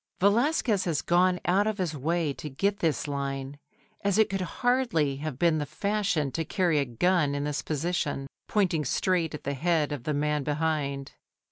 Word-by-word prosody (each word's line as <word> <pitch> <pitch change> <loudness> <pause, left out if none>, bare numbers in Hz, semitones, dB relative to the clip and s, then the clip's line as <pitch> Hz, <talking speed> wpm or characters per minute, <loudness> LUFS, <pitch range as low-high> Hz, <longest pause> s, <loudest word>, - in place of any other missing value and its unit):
Velazquez 220 - +2
has 165 -5 0
gone 180 +1 +3
out 195 +4 +3
of 215 -1 -1
his 175 -5 -2
way 155 +1 0
to 150 - -7
get 200 +9 0
this 160 -2 0
line, 140 0 -4 0.4
as 200 0 +2
it 220 -3 +4
could 195 -1 -1
hardly 220 - +1
have 150 -2 -5
been 165 0 +3
the 145 - -2
fashion 190 -3 0
to 165 - -2
carry 170 -1 +1
a 140 - +1
gun 145 +4 +1
in 145 - -2
this 145 -1 -2
position, 150 -3 -2 0.2
pointing 180 -7 +1
straight 165 +3 0
at - - -9
the 140 - -2
head 155 +1 +1
of 145 -5 -4
the 150 - -1
man 150 0 0
behind. 145 -2 -1
160 Hz, 180 wpm, -28 LUFS, 145-185 Hz, 0.4 s, it